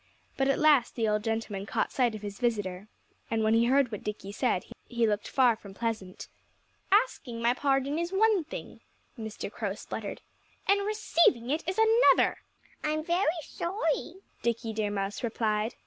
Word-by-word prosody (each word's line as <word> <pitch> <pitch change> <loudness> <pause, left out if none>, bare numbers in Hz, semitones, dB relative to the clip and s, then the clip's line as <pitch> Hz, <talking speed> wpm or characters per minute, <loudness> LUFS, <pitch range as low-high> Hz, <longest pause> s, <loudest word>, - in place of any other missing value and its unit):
But 270 - +1
at 275 - +2
last 295 -6 +4
the 225 -2 0
old 210 0 +1
gentleman 220 -3 -3
caught - - -1
sight 245 -4 +1
of 210 - -9
his 200 -1 -6
visitor. 205 -5 -1 0.4
And 225 -1 0
when 220 +1 +3
he 230 +1 +4
heard 265 0 +3
what 210 - -6
Dickie 210 -2 -5
said 210 -4 0 0.2
he 235 -1 +1
looked 210 -1 0
far 250 -4 +4
from 200 -3 -13
pleasant. 220 -5 -4 0.6
"Asking 390 - +1
my 235 +1 +3
pardon 275 +2 +1
is 340 +1 -2
one 410 -2 +3
thing," 310 - -8 0.4
Mr. 220 -4 -6
Crow 205 -4 -3
spluttered. 210 -1 -6 0.5
"And 400 +1 +3
receiving 340 - +2
it 310 +3 0
is 370 - -3 0.4
another." - - +2 0.4
"I'm 310 0 0
very 345 -1 0
sorry," 340 -1 -2 0.3
Dickie 230 -1 -1
Deer 215 -1 -1
Mouse 200 0 -3
replied. 220 -1 -1
235 Hz, 165 wpm, -29 LUFS, 215-305 Hz, 0.6 s, last